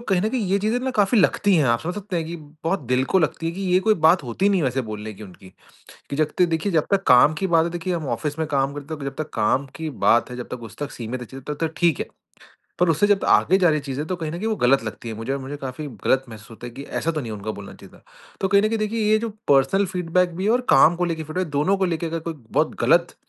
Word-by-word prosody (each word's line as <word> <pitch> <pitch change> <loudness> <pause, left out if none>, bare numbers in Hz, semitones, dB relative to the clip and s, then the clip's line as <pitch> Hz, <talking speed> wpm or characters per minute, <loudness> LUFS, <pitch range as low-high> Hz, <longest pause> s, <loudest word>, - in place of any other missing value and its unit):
कहीं 195 -6 0
न 215 - +1
कहीं 240 -2 -1
ये 200 - +3
चीज़ें 220 +4 0
ना 260 0 -2
काफ़ी 205 +3 +3
लगती 200 +2 +3
हैं। 150 - +3
आप 120 0 +2
समझ 175 +2 -4
सकते 200 -2 -4
हैं 165 - -1
कि 170 +1 -5
बहुत 160 +4 -4
दिल 130 +1 +3
को - - +7
लगती 165 0 -1
है 165 - -1
कि 190 - -7
ये 185 - +6
कोई 215 - +6
बात 175 0 +4
होती 180 +12 0
नहीं 195 -3 +2
है 150 - 0
वैसे 130 +1 0
बोलने 105 0 -6
की 110 - -12
उनकी 95 0 -14 0.6
कि 140 - -3
जब 155 0 +1
तक 180 - +5
देखिए 165 +4 -1
जब 160 -3 +1
तक 195 -1 +2
काम 125 +5 +7
की 190 - +1
बात 160 - +5
है - - -1
देखिए 175 +1 -3
हम 155 -4 -4
ऑफिस 150 +5 -4
में 160 - -1
काम 140 -1 0
करते 145 +3 -8
हैं 150 -2 -6
जब 135 0 -5
तक 150 - -17
काम 125 +5 +1
की 160 -1 -4 0.2
बात 120 +2 +4
है 125 - -6
जब 125 - -6
तक 120 - -11
उस - - -18
तक 145 0 -5
सीमित 120 +2 -5
है - - -6
चलिए 135 0 -10
तब - - -12
तक 160 - -13
ठीक 170 -5 +2
है। - - -3 0.7
पर 180 -1 +3
उससे 165 +6 +3
जब 205 -1 +2
आगे 190 - +4
जा 180 -3 +4
रही 155 - +2
है 145 - -12
चीज़ें 140 +2 -3
तो 185 - -2
कहीं 160 -3 -5
न 170 - -5
कहीं 215 - -3
वो 220 - 0
गलत 130 - +3
लगती 110 +1 -7
है - - -4
मुझे 115 +4 -4
और 140 - -3
मुझे 140 +2 -6
काफ़ी 135 +2 -6 0.2
गलत 135 0 +2
महसूस 110 -1 -12
होता 115 +2 -10
है 120 - -9
कि 140 - -8 0.2
ऐसा 165 - 0
तो 155 -2 -3
नहीं 115 -3 -6
है 105 - -5
उनको 110 +2 -5
बोलना 100 -1 -9
चाहिए - - -15
था। - - -26 0.4
तो 190 - +2
कहीं 200 +1 +4
न 215 - +2
कहीं 225 - 0
देखिए 215 +1 -1
ये 215 - +5
जो 230 - -3 0.2
पर्सनल 140 +9 +4
फ़ीडबैक 180 -1 0
भी 185 - -4
है - - +2
और 245 - +2
काम 155 +5 +6
को 180 - 0
लेके 165 -2 -3
फ़ीडबैक 170 +5 -3
है। - - -10
दोनों 150 +8 +1
को 190 - +1
लेके 170 -2 -2
अगर 165 0 -3
कोई 165 +1 -5 0.2
बहुत - - +1
गलत - - +3
160 Hz, 310 wpm, -23 LUFS, 135-185 Hz, 0.7 s, को